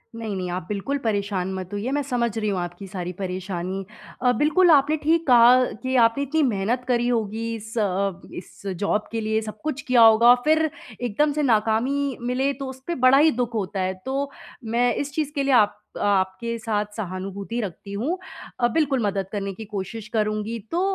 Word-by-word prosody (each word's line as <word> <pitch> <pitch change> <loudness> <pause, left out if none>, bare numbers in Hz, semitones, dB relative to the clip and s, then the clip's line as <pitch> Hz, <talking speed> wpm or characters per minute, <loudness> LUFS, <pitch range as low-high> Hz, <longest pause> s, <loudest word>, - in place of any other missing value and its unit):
नहीं, 220 -3 -4
नहीं 180 -1 -3
आप 180 -2 -4
बिल्कुल 210 +8 -2
परेशान 200 -3 -1
मत 185 -1 -5
होइए 205 +6 -2
मैं 290 +1 +1
समझ 235 -4 -1
रही 215 -1 0
हूँ 190 -2 -1
आपकी 175 +3 -6
सारी 180 -2 -5
परेशानी। 185 0 -4 0.4
अ, 250 -1 +4
बिल्कुल 335 +4 +4
आपने 295 +1 +4
ठीक 330 +2 +2
कहा 245 +1 +7 0.2
कि 260 0 -1
आपने 230 +5 +1
इतनी 310 +3 0
मेहनत 235 +1 0
करी 240 -1 +1
होगी 230 -1 -1
इस 220 +2 -9
अ - - +3
अ, 195 -1 -1
इस 175 - -10
ज़ॉब 200 +3 -1
के 225 -1 -2
लिए 220 0 0
सब 215 -1 -8
कुछ 290 -3 -2
किया 250 -2 +3
होगा। 230 +2 +8
फिर 315 +1 +3 0.3
एकदम 245 +6 +1
से 300 0 0
नाकामी 250 +4 +1
मिले 255 +3 0
तो 275 0 -6
उसपे 265 +6 -5
बड़ा 260 +2 +7
ही 310 +2 +5
दुःख 240 -2 -2
होता 200 -2 -2
है। 185 0 0
तो 275 +1 -2 0.3
मैं 235 +1 +1
इस 285 0 -3
चीज़ 300 -1 -1
के 280 - +1
लिए 275 - +2
आप 210 -3 +4 0.2
आपके 200 +3 0
साथ 215 -2 -1
सहानुभूति 195 +3 -5
रखती 200 +1 -7
हूँ। 275 - -1 0.4
अ, 240 - +4
बिल्कुल 285 -5 +2
मदद 195 -1 -1
करने 200 -2 -3
की 220 +3 -9
कोशिश 210 +2 -6
करुँगी। 215 +1 -1
तो 345 +2 0
225 Hz, 195 wpm, -24 LUFS, 200-260 Hz, 0.4 s, होगा